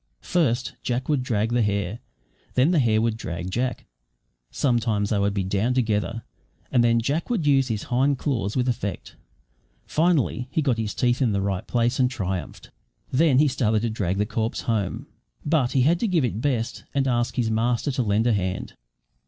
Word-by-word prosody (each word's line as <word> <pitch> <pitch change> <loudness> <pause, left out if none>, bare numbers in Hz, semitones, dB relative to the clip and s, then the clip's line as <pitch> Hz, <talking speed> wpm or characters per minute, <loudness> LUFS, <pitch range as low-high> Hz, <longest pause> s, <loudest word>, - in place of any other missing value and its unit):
First 130 -9 0
Jack 125 +1 -2
would 145 -4 +2
drag 115 -3 -1
the 120 - +3
hare, 100 0 -1 0.5
and - - -32
then 130 +7 +4
the 170 - +3
hare 110 -4 +3
would 110 0 0
drag 85 -3 -5
Jack; 125 +5 -2 0.6
sometimes 115 -6 0
they 105 - +2
would 100 0 0
be 100 - 0
down 100 +6 0
together, 115 -1 0 0.5
and 125 -3 +4
then 115 0 +3
Jack 145 +8 -1
would 220 -10 0
use 135 -3 +4
his 110 -4 -2
hind 135 +3 +1
claws 115 -8 -2
with 130 -1 +1
effect; 115 -5 -3 0.7
finally 155 -6 +1
he 155 +3 0
got 125 -5 +1
his 105 -2 -3
teeth 125 +2 +1
in 120 -5 +2
the 100 - +1
right 95 -2 -2
place, 120 +1 +1
and 125 -1 +4
triumphed. 95 -8 -5 0.4
Then 140 -1 +4
he 150 +2 +5
started 115 -5 +1
to 115 - 0
drag 95 -4 -1
the 105 - +1
corpse 110 +1 -2
home, 110 -5 -2 0.4
but 145 -5 +1
he 135 - +3
had 165 +5 +3
to 230 - 0
give 170 -8 +2
it 110 -2 -3
best 120 -5 -1
and 135 -1 +2
ask 120 -1 0
his 115 -3 0
master 120 +5 0
to 130 - -1
lend 110 0 +1
a 120 - +3
hand. 95 -2 -2
120 Hz, 195 wpm, -24 LUFS, 105-130 Hz, 0.7 s, he